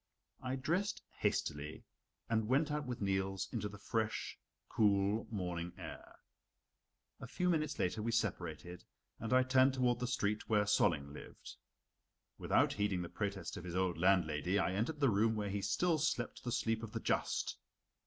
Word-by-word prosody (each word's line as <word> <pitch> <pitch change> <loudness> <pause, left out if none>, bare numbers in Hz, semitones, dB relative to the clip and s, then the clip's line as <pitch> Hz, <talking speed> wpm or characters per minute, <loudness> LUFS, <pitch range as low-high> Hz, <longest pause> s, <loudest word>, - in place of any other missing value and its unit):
I 130 0 -2
dressed 175 +9 -1 0.2
hastily 75 +1 -1 0.4
and 110 -1 +1
went 145 +5 +2
out 150 -2 -2
with 125 -3 -4
Niels 95 -1 0
into 105 -3 -2
the 105 - -10
fresh, 110 +2 -2 0.3
cool 100 0 +2
morning 90 -4 -3
air. - - -9 1.0
A - - -7
few 180 +9 +1
minutes 155 -3 0
later 90 +4 0
we 115 +2 -1
separated, 90 -6 -2 0.4
and 115 - -4
I 130 0 +6
turned 130 +1 +4
toward 125 -2 +2
the 125 - -1
street 105 -4 -1
where 105 -2 +4
Solling 70 -8 +2
lived. - - -10 0.8
Without - - +3
heeding 100 -3 0
the 85 - -6
protest 100 -4 -3
of - - -7
his 90 -1 -5
old 90 -2 0
landlady, 90 -1 +3
I 95 -2 +1
entered 125 +10 -1
the 140 - +5
room 110 +2 +3
where 105 -2 -2
he 100 0 -1
still 160 - +1
slept 130 -6 -1
the 120 - -2
sleep 115 -2 0
of 115 -2 -7
the - - -2
just. - - 0
105 Hz, 165 wpm, -36 LUFS, 95-125 Hz, 1.0 s, I